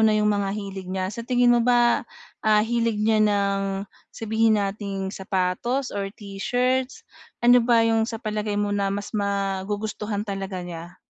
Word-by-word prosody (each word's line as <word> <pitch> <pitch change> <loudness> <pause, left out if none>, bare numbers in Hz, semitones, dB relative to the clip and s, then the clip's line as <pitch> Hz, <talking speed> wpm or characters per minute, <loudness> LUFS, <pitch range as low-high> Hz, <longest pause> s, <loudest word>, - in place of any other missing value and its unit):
na 215 -1 +4
'yong 210 0 +2
mga 200 -1 0
hilig 195 -2 -6
niya, 185 +1 -2
sa 235 - -6
tingin 245 0 +3
mo 240 - +4
ba, 240 0 +4 0.4
ah, 215 0 +3
hilig 230 -1 0
niya 215 0 +3
ng 200 -1 +1 0.2
sabihin 220 0 +1
nating 195 -1 -3
sapatos 195 +8 -1
or 200 -1 -2
t-shirts. 250 - -2 0.4
Ano 245 +1 +7
ba 230 -1 +4
'yong 225 0 +2
sa 225 - -4
palagay 210 -2 -3
mo 205 0 0
na, 200 -1 0
mas 200 +2 -4
magugustuhan 205 +1 -2
talaga 195 -3 -4
niya? 170 0 -8
210 Hz, 155 wpm, -24 LUFS, 195-225 Hz, 0.4 s, Ano